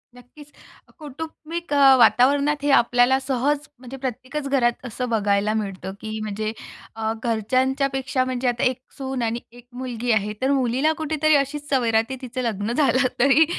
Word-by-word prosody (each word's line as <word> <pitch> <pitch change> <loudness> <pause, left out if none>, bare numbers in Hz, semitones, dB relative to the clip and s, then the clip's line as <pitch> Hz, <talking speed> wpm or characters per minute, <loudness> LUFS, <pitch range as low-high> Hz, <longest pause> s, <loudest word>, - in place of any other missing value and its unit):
नक्कीच. 280 +4 -16 0.5
कौटुंबिक 320 +2 -7
अ, 275 -2 +7
वातावरणात 280 +5 +4
हे 290 - +1
आपल्याला 245 0 +4
सहज 280 +3 -1
म्हणजे 255 +1 -9
प्रत्येकच 265 +3 -5
घरात 250 -2 +1
असं 250 +1 -4
बघायला 205 -1 +1
मिळतं 195 -3 -4
की 220 0 -5
म्हणजे 215 +1 -3 0.4
अ, 220 0 -2
घरच्यांच्यापेक्षा 260 +4 0
म्हणजे 255 0 -2
आता 240 -1 0
एक 255 -1 +2 0.2
सून 265 -2 -4
आणि 230 +1 -1
एक 245 +1 -16
मुलगी 245 -1 -3
आहे. 210 -1 +1
तर 265 +1 +2
मुलीला 265 +2 +2
कुठेतरी 310 0 +2
अशीच 290 +1 -1
सवय 250 -4 +1
राहते 225 +4 +1
तिचं 255 0 -5
लग्न 220 -2 -2
झालं 270 -1 +3
तरी 275 +5 +5
255 Hz, 155 wpm, -23 LUFS, 230-280 Hz, 0.5 s, अ